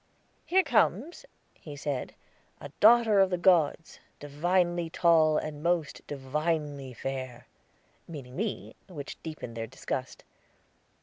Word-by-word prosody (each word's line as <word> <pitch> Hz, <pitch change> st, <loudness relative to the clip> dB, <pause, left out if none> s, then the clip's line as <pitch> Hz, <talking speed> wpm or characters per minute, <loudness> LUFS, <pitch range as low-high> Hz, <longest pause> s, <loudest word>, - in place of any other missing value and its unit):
"Here 375 Hz, +2 st, +4 dB
comes," 350 Hz, +8 st, 0 dB, 0.3 s
he 150 Hz, -2 st, -11 dB
said, 140 Hz, -2 st, -4 dB, 0.4 s
"'a 145 Hz, -, -9 dB
daughter 220 Hz, -1 st, +6 dB
of 195 Hz, -1 st, +5 dB
the 180 Hz, -, -1 dB
gods, 170 Hz, -3 st, +2 dB, 0.2 s
divinely 175 Hz, +3 st, 0 dB
tall, 160 Hz, -2 st, +4 dB
and 150 Hz, -1 st, -4 dB
most 170 Hz, -2 st, -1 dB
divinely 145 Hz, 0 st, -3 dB
fair.'" 130 Hz, 0 st, -6 dB, 0.6 s
Meaning 135 Hz, -6 st, -9 dB
me, 210 Hz, +3 st, -4 dB
which 150 Hz, -7 st, -8 dB
deepened 155 Hz, -7 st, -7 dB
their 115 Hz, 0 st, -4 dB
disgust. 130 Hz, +1 st, -5 dB
155 Hz, 115 wpm, -28 LUFS, 140-175 Hz, 0.6 s, daughter